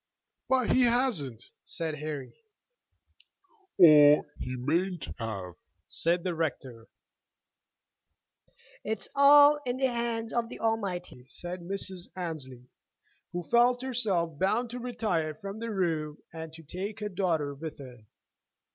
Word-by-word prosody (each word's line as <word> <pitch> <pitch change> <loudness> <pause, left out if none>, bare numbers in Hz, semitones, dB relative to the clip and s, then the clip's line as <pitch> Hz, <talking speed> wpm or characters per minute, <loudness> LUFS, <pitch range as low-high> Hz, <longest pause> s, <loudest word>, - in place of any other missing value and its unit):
"But 260 -3 +2
he 255 - +4
hasn't," 215 - -1
said 160 -3 -4
Harry. 150 -3 -5 1.4
"Or 150 -3 +8
he 125 +1 -4
mayn't 170 +7 -1
have," 100 -6 -5 0.4
said 170 +1 0
the 180 - -1
rector. 130 -7 -4 2.0
"It's 220 0 -1
all 290 +1 +7
in 250 -1 -2
the 260 -1 +1
hands 230 -1 -2
of 235 -1 0
the - - -9
Almighty," 185 - -2
said 175 +5 -6
Mrs. 190 0 -2
Annesley, 140 -9 -6 0.6
who 175 0 -4
felt 245 +5 +3
herself 195 - -1
bound 230 +6 +1
to 250 - -5
retire 215 -11 -2
from 195 +5 -7
the 230 0 -4
room 160 -7 -1 0.2
and 160 -1 -7
to 165 0 -12
take 195 +7 -6
her 210 -1 -3
daughter 170 -7 -1
with 155 +2 -7
her. 125 -6 -12
175 Hz, 125 wpm, -29 LUFS, 150-225 Hz, 2.0 s, Or